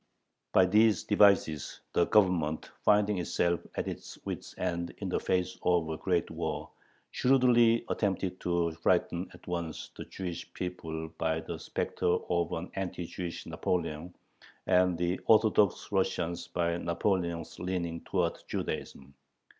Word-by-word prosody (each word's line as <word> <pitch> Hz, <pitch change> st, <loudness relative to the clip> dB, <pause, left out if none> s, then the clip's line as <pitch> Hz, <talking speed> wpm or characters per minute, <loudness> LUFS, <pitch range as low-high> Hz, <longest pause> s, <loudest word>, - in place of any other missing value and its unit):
By 95 Hz, -, +6 dB
these 105 Hz, +3 st, +4 dB
devices 100 Hz, -8 st, +3 dB
the -, -, +3 dB
Government, 90 Hz, -7 st, +2 dB
finding 105 Hz, -1 st, +4 dB
itself 85 Hz, 0 st, +1 dB, 0.2 s
at -, -, -2 dB
its -, -, -6 dB
wits' -, -, -5 dB
end 85 Hz, -1 st, -2 dB
in -, -, -4 dB
the -, -, 0 dB
face 90 Hz, 0 st, -1 dB
of 85 Hz, -3 st, +2 dB
a 80 Hz, -, -3 dB
great 90 Hz, -1 st, 0 dB
war, -, -, -4 dB, 0.4 s
shrewdly 120 Hz, -3 st, +4 dB
attempted 95 Hz, -3 st, -1 dB
to 85 Hz, -1 st, 0 dB
frighten 85 Hz, +2 st, 0 dB
at 90 Hz, -, -17 dB
once 85 Hz, -3 st, -4 dB
the -, -, -7 dB
Jewish 90 Hz, -3 st, -6 dB
people 80 Hz, -3 st, -4 dB
by 80 Hz, 0 st, +1 dB
the -, -, -6 dB
specter -, -, -2 dB, 0.2 s
of 85 Hz, -1 st, +1 dB
an 85 Hz, +3 st, -4 dB
anti 90 Hz, -2 st, -3 dB
Jewish 85 Hz, 0 st, -6 dB
Napoleon 85 Hz, -1 st, -2 dB, 0.5 s
and 90 Hz, -1 st, +3 dB
the 90 Hz, +2 st, 0 dB
Orthodox 110 Hz, -3 st, +4 dB
Russians 90 Hz, -3 st, 0 dB
by 85 Hz, -1 st, 0 dB
Napoleon's 85 Hz, -1 st, -1 dB
leaning 85 Hz, -2 st, -2 dB
towards 90 Hz, -3 st, -1 dB
Judaism. 70 Hz, 0 st, -5 dB
90 Hz, 135 wpm, -30 LUFS, 85-95 Hz, 0.5 s, By